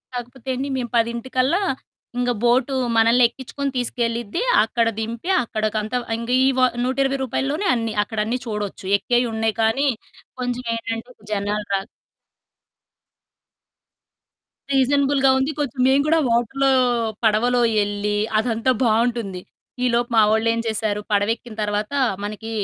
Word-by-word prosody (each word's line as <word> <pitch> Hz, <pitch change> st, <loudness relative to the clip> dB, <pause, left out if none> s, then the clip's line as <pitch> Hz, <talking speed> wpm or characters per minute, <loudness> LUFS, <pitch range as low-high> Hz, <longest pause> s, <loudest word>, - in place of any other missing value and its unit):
కాకపోతే 245 Hz, +2 st, -7 dB
అండి 270 Hz, +3 st, -3 dB
మేము 240 Hz, -2 st, -3 dB
పదింటికల్లా 255 Hz, -, 0 dB, 0.6 s
ఇంగ 245 Hz, 0 st, +1 dB
బోటు 245 Hz, +3 st, +3 dB, 0.2 s
మనల్నెక్కించుకొని 245 Hz, +4 st, +2 dB
తీసుకెళ్ళిద్ది. 235 Hz, -, -2 dB, 0.2 s
అక్కడ 230 Hz, +1 st, 0 dB
దింపి 230 Hz, +9 st, -4 dB
అక్కడకంత 215 Hz, 0 st, -2 dB, 0.2 s
ఇంగ 235 Hz, +1 st, -6 dB, 0.2 s
ఈ -, -, +5 dB
వ -, -, +3 dB, 0.2 s
120 270 Hz, +2 st, 0 dB
రూపాయల్లోనే 275 Hz, -, -1 dB
అన్ని 225 Hz, -2 st, -2 dB
అక్కడన్నీ 220 Hz, +3 st, -2 dB
చూడొచ్చు. 210 Hz, -4 st, -5 dB
ఎక్కేయి 245 Hz, +2 st, +1 dB
ఉన్నాయి 220 Hz, -1 st, 0 dB
కానీ 265 Hz, +6 st, +2 dB, 0.5 s
కొంచెం 245 Hz, 0 st, -2 dB
ఏంటంటే 225 Hz, +1 st, -5 dB, 0.2 s
జనాలు 205 Hz, +1 st, -2 dB
రా 195 Hz, -, +2 dB, 2.9 s
రీజనబుల్‌‌గా 275 Hz, 0 st, +3 dB
ఉంది. 265 Hz, +3 st, 0 dB
కొంచెం 275 Hz, -3 st, -3 dB
మేము 270 Hz, +1 st, +4 dB
కూడా 325 Hz, +1 st, +4 dB
వాటర్‌లో 240 Hz, +4 st, +1 dB, 0.5 s
పడవలో 235 Hz, +3 st, +3 dB, 0.2 s
ఎళ్ళి 205 Hz, 0 st, -2 dB, 0.2 s
అదంతా 230 Hz, +2 st, +1 dB
బావుంటుంది. 225 Hz, -4 st, 0 dB, 0.4 s
ఈలోపు 240 Hz, -1 st, +1 dB
మా 220 Hz, -, +7 dB
వోళ్ళేం 230 Hz, +1 st, +2 dB
చేశారు, 215 Hz, -1 st, -1 dB
పడవెక్కిన 215 Hz, +3 st, 0 dB
తర్వాత 210 Hz, +4 st, -2 dB, 0.3 s
మనకి 215 Hz, +2 st, -6 dB
235 Hz, 115 wpm, -22 LUFS, 220-255 Hz, 2.9 s, మా